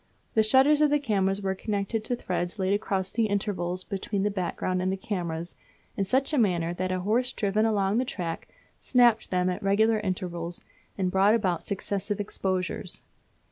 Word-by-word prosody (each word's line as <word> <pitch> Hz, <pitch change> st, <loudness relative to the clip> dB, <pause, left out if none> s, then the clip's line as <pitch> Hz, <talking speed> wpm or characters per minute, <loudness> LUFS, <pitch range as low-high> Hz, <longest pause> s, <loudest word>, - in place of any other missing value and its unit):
The 220 Hz, -, +4 dB
shutters 265 Hz, +7 st, +5 dB
of 300 Hz, -, +5 dB
the 295 Hz, -, +4 dB
cameras 200 Hz, -7 st, 0 dB
were 190 Hz, 0 st, 0 dB
connected 205 Hz, +2 st, -2 dB
to 245 Hz, -, -1 dB
threads 180 Hz, -3 st, -3 dB
laid 190 Hz, 0 st, +1 dB
across 195 Hz, -2 st, -1 dB
the 225 Hz, -1 st, +1 dB
interval 195 Hz, -3 st, -1 dB
between 195 Hz, 0 st, -2 dB
the 205 Hz, -, +1 dB
background 185 Hz, -1 st, -2 dB
and 185 Hz, +1 st, 0 dB
the 190 Hz, -, -2 dB
cameras 175 Hz, -4 st, -4 dB, 0.4 s
in 195 Hz, -, 0 dB
such 265 Hz, +9 st, +1 dB
a 290 Hz, -, +3 dB
manner 175 Hz, -6 st, +1 dB
that 185 Hz, +1 st, -2 dB
a 185 Hz, 0 st, -1 dB
horse 235 Hz, +6 st, +1 dB
driven 210 Hz, +1 st, +1 dB
along 205 Hz, 0 st, +1 dB
the -, -, +2 dB
track 175 Hz, -9 st, -4 dB, 0.3 s
snapped 240 Hz, -3 st, +3 dB
them 180 Hz, 0 st, +1 dB
at 180 Hz, -, -2 dB
regular 215 Hz, +3 st, +3 dB
intervals, 175 Hz, -3 st, -4 dB, 0.3 s
and 185 Hz, -2 st, 0 dB
brought 195 Hz, +3 st, +4 dB
about 185 Hz, -7 st, 0 dB
successive 200 Hz, +1 st, -3 dB
exposures. 190 Hz, -2 st, -2 dB
195 Hz, 180 wpm, -27 LUFS, 185-220 Hz, 0.4 s, shutters